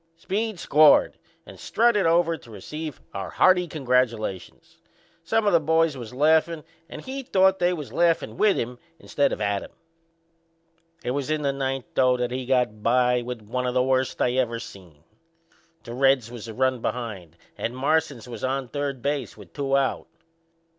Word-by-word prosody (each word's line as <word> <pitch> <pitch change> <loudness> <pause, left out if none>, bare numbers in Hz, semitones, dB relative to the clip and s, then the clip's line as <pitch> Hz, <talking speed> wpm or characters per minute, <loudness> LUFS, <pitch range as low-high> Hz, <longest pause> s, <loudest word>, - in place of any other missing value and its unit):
Speed 205 +3 -3
scored 150 0 +5 0.3
and - - -13
strutted 225 -5 +2
over 165 0 +3
to 120 - -15
receive 150 +8 -7
our 95 -1 -5
hearty 180 -1 +3
congratulations. 125 - -2 0.4
Some 225 +6 +1
o' 205 - +3
the 170 - +5
boys 160 0 +2
was 120 -4 -8
laughin' 155 +4 +2 0.3
and - - -9
he 270 +1 -5
thought 190 -6 +3
they 175 0 +2
was 155 -6 -6
laughin' 170 -1 +1
with 210 -2 +3
him 120 +1 -4 0.2
instead 140 -3 0
of - - -3
at 100 -1 0
him. - - -10 1.3
It 125 - -2
was 140 +1 -3
in 155 -1 -1
the 140 -1 +1
ninth, 135 -2 -3
though, 130 -1 +3
that 125 0 -2
he 130 0 -4
got 125 -5 +1
by 125 +1 +2
with 120 -2 -6
one 125 +4 -3
o' - - 0
the 125 0 +2
worst 130 0 0
I 125 - +2
ever 120 -3 0
seen. 85 -9 -12 0.8
The 120 - -8
Reds 130 -2 +2
was 120 -2 -8
a 110 - -7
run 130 -1 +1
behind 100 -11 -5 0.2
and 120 - -4
Marsans 145 -3 0
was 120 - -8
on 130 -1 -2
third 140 -2 -4
base 140 -6 -2
with 95 -6 -14
two 135 -1 0
out. 135 -2 -1
130 Hz, 175 wpm, -24 LUFS, 120-160 Hz, 1.3 s, scored